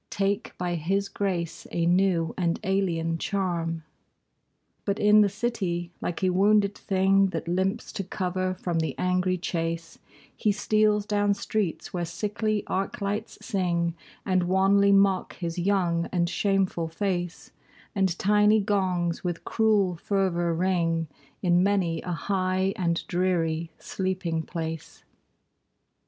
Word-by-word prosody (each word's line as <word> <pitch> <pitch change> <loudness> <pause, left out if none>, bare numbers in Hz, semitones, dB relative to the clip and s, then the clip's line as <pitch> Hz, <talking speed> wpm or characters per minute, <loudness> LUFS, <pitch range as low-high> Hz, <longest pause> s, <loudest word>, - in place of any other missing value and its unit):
Take 200 +1 -1
by 180 -1 -2
his 195 +5 -1
grace 180 -5 -3
a 170 -1 0
new 175 -2 +2
and 170 -2 0
alien 170 -4 0
charm. 170 -5 -2 1.0
But 200 0 -1
in 210 0 +6
the 205 - +4
city, 190 -6 -2
like 175 +2 -3
a 185 - +3
wounded 200 +2 +3
thing 195 0 +3
That 185 - -4
limps 190 +5 -1
to 195 - -4
cover 185 0 -2
from 175 -2 -2
the 160 - -2
angry 180 0 +1
chase, 165 -2 -3 0.4
He 210 - +1
steals 210 0 +2
down 205 -1 +1
streets 200 -3 -2
where 175 -1 -1
sickly 210 +5 -2
arc 195 +1 -2
lights 205 +2 -3
sing, 175 -5 0 0.3
And 185 -2 +1
wanly 195 +2 +4
mock 195 -1 +3
his 170 -1 -4
young 175 -3 +1
and 175 -2 +1
shameful 190 -3 0
face; 175 0 -3 0.4
And 190 -4 +1
tiny 210 +2 +4
gongs 185 -4 0
with 175 -2 -3
cruel 205 -5 +2
fervor 175 -2 0
ring 165 -3 0 0.3
In 175 -1 +4
many 185 -4 +1
a 180 - -5
high 185 +1 0
and 170 -2 -1
dreary 170 -3 0
sleeping 185 -4 -2
place. 160 -1 -6
185 Hz, 130 wpm, -26 LUFS, 170-200 Hz, 1.0 s, in